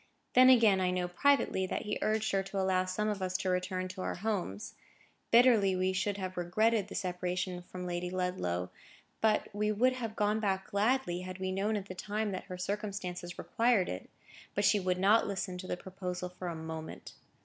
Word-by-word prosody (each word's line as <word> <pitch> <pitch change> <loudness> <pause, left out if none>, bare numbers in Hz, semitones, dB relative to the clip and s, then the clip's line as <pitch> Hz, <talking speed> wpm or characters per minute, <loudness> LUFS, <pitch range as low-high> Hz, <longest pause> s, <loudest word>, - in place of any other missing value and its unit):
Then, 255 +1 +8
again, 220 -7 +6
I 185 - +2
know 180 -1 0
privately 190 -1 +2
that - - -3
he 210 - -3
urged 215 0 +1
her 195 - +2
to 195 +1 -4
allow 190 -1 +2
some 185 +3 -1
of 205 -2 -2
us 185 0 0
to 190 -1 -1
return 185 0 -1
to 185 +1 -7
our - - -2
homes. 185 - -3 0.6
Bitterly 230 -5 +5
we 185 +1 +1
should 195 +2 -1
have 185 -2 -5
regretted 210 +4 +2
the - - -8
separation 180 -1 -2
from 180 +1 -8
Lady 175 0 -2
Ludlow; 180 - -2 0.5
but 215 -2 +2
we 210 +1 0
would 250 +5 +3
have 230 -4 -5
gone 210 +1 +1
back 195 -3 -1
gladly, 205 -3 +1
had 185 0 -6
we 190 0 -2
known 200 +3 0
at 195 - -5
the 185 - -7
time 210 +3 -2
that 185 - -5
her 185 -2 -7
circumstances 185 -2 -4
required 230 -5 +2
it: 90 - -6 0.5
but 205 - +2
she 210 - +5
would 185 -1 0
not 205 +4 +4
listen 190 -2 -3
to 185 - -7
the - - -2
proposal 180 -1 -5
for 180 0 -7
a 170 - -3
moment. 160 0 -7
190 Hz, 200 wpm, -32 LUFS, 180-210 Hz, 0.6 s, Then